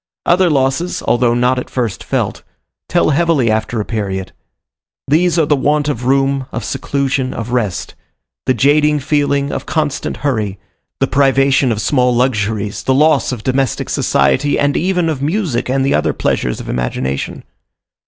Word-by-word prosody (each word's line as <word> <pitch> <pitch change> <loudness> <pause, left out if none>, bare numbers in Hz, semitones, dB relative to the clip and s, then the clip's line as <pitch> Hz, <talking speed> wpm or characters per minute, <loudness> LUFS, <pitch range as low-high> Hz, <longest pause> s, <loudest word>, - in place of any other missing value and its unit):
Other 180 +1 +3
losses, 140 +4 0
although 120 -1 +2
not 125 +1 +2
at - - -7
first 120 -6 -3
felt, - - -2 0.5
tell - - +2
heavily 150 -6 +2
after 110 +1 -1
a 105 - -2
period: 95 -4 -3 0.8
these 170 +4 +2
are 160 - +3
the 145 - +2
want 145 +2 +1
of 125 -4 -3
room, 135 0 +1
of 120 - -4
seclusion, 135 +3 -2
of 115 +1 -5
rest; 110 -7 -2 0.5
the 130 - +3
jading 150 +4 +3
feeling 145 -1 +1
of - - -5
constant 150 -3 -2
hurry; 105 -8 -1 0.4
the 135 - +3
privation 135 -1 +3
of 110 -1 -1
small 125 -3 +2
luxuries, 110 -4 -1
the 130 - +1
loss 155 +1 +3
of 120 -4 -5
domestic 130 -1 -1
society 70 - +1
and 145 0 +1
even 180 -1 +1
of 155 -4 -2
music 150 - -1
and 135 +1 +1
the 140 - +1
other - - +1
pleasures 60 - -1
of - - -8
imagination. 65 +2 -3
135 Hz, 160 wpm, -16 LUFS, 120-145 Hz, 0.8 s, Other